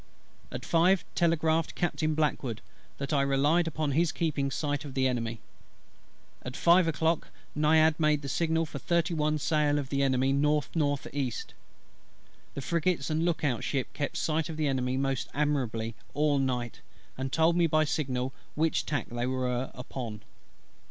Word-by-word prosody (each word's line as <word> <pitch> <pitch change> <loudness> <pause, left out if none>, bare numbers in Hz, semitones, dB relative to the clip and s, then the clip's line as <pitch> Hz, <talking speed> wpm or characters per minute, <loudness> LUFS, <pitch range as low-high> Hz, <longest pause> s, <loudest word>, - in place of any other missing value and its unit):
At 125 -1 -6
five 175 +3 +3
telegraphed 165 -1 +1
Captain 155 -3 0
BLACKWOOD, 135 -7 -1 0.3
that 140 +2 -3
I 140 - +3
relied 145 +5 +2
upon 155 -2 -1
his 160 +3 +2
keeping 150 -4 -1
sight 145 +1 -2
of 140 -3 -8
the 130 -1 +3
Enemy. 115 -3 -2 1.0
At 125 +1 -7
five 175 +1 +5
o'clock 165 +1 +1 0.3
Naiad 155 +1 +4
made 150 -2 +2
the - - -4
signal 160 +3 +1
for 145 -2 -7
thirty 170 +2 +1
one 155 -1 +1
sail 150 -1 +1
of 140 -2 -3
the 140 -1 0
Enemy 130 -1 +2
N.N.E. 145 -2 0 1.2
The 140 - -3
frigates 170 0 0
and 155 +1 +1
look 170 -3 0
out 130 -6 0
ship 135 -3 -2
kept 145 - -3
sight 160 0 0
of 160 - -5
the 155 - 0
Enemy 130 -2 0
most 135 -1 -1
admirably 125 -7 0 0.2
all 145 -1 +2
night, 125 -3 -2 0.3
and 130 0 -4
told 165 +2 +3
me 170 -1 +4
by 155 0 +3
signal 130 -4 -1 0.2
which 160 +1 +1
tack 145 -6 -1
they 120 +1 -2
were 130 0 -1
upon. 120 -4 -6
145 Hz, 160 wpm, -29 LUFS, 130-160 Hz, 1.2 s, five